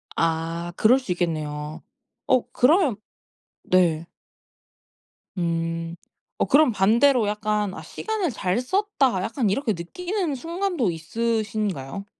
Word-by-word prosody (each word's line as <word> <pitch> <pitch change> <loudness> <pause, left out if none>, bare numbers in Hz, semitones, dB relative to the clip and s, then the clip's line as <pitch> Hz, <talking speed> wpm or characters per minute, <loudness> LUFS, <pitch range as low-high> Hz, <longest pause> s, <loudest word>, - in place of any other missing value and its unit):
아 165 +1 -1
그럴 245 +5 +5
수 255 -8 -5
있겠네요. 155 -3 -3 0.4
어 255 - +2
그러면 290 - +4 0.7
네. 170 -3 +2 1.3
음. 165 -1 -2 0.4
어 - - +2
그럼 295 -2 +5
반대로 230 +4 +4
약간 210 -1 -1
'아 - - -7
시간을 430 -8 -3
잘 190 -2 -1
썼다.' 270 - +1
약간 230 +1 0
이렇게 225 +3 0
느끼는 345 - -3
순간도 335 - -1
있으신가요? 200 - -2
210 Hz, 220 characters per minute, -24 LUFS, 170-270 Hz, 1.3 s, 그럴